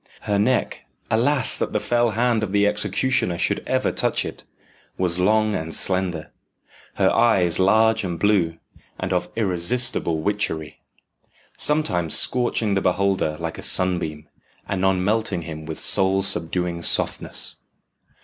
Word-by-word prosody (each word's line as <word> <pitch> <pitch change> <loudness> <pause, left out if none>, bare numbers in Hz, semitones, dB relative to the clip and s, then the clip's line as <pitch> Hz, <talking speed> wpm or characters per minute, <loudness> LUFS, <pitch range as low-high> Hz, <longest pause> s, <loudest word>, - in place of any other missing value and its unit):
Her 100 -1 -1
neck 125 +5 -1 0.3
alas! 130 +5 +2
that - - -3
the - - +1
fell 120 0 +1
hand 120 -2 +1
of 105 -3 -3
the 100 0 +2
executioner 105 -1 0
should - - -1
ever - - 0
touch - - -1
it - - -8 0.5
was 90 -1 0
long 110 +3 +2
and 80 -3 -3
slender, 90 -4 -1 0.6
her - - +2
eyes 95 -8 +2
large 110 +3 +3
and 90 -3 -4
blue, 95 -6 +1 0.4
and 95 0 -3
of 90 - -2
irresistible 100 -2 0
witchery 80 -6 -2 0.8
sometimes 90 - 0
scorching 120 -4 +1
the 95 - 0
beholder 95 -4 0
like - - -5
a - - -6
sunbeam, 85 -5 +1 0.4
anon 95 -1 0
melting 105 -4 -1
him 80 -1 -8
with 80 - -6
soul 95 0 +3
subduing 85 -1 -3
softness. - - +3
95 Hz, 135 wpm, -22 LUFS, 85-110 Hz, 0.8 s, large